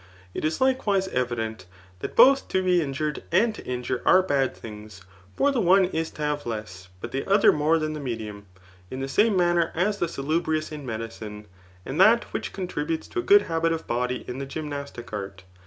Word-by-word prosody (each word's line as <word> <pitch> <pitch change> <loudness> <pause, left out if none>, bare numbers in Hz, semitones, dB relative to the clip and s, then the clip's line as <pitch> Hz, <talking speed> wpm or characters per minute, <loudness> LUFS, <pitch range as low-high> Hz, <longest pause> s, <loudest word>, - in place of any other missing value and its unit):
It - - -5
is 155 +1 0
likewise 215 -8 +2
evident, 115 - -3 0.3
that - - -6
both 270 +3 +6
to 190 - 0
be 180 -1 +3
injured 150 +1 -3
and 215 +6 +3
to - - -10
injure 125 0 -2
are 185 0 +5
bad 140 -6 0
thuigs; 105 -3 -10 0.3
for 280 - +3
the 260 -4 0
otie 185 +1 +4
is 160 0 -1
to 150 - -7
have 150 -3 -2
less, 105 -5 -6
but - - -6
the 135 - -2
other 200 +1 +6
more 155 +2 +2
than 155 -1 -2
the 155 - -5
medium; 110 -6 -6 0.4
in 130 - -6
the 135 - -3
same 205 +8 +3
manner 175 -2 +2
as 200 +5 0
the 175 - +1
salubrious 155 +1 -1
in 150 -3 -7
medicine, 110 -2 -6 0.4
and 145 +7 -1
that 225 +4 +6
which - - -3
contributes 165 -4 -3
to - - -3
a - - +1
good 400 +3 +6
habit 165 0 0
of 165 -1 -3
body 125 +1 -2
in 125 +2 -5
the 140 - -5
gym 150 +3 -5
nastic 140 -5 -7
art. 100 -2 -6
150 Hz, 205 wpm, -25 LUFS, 120-180 Hz, 0.4 s, both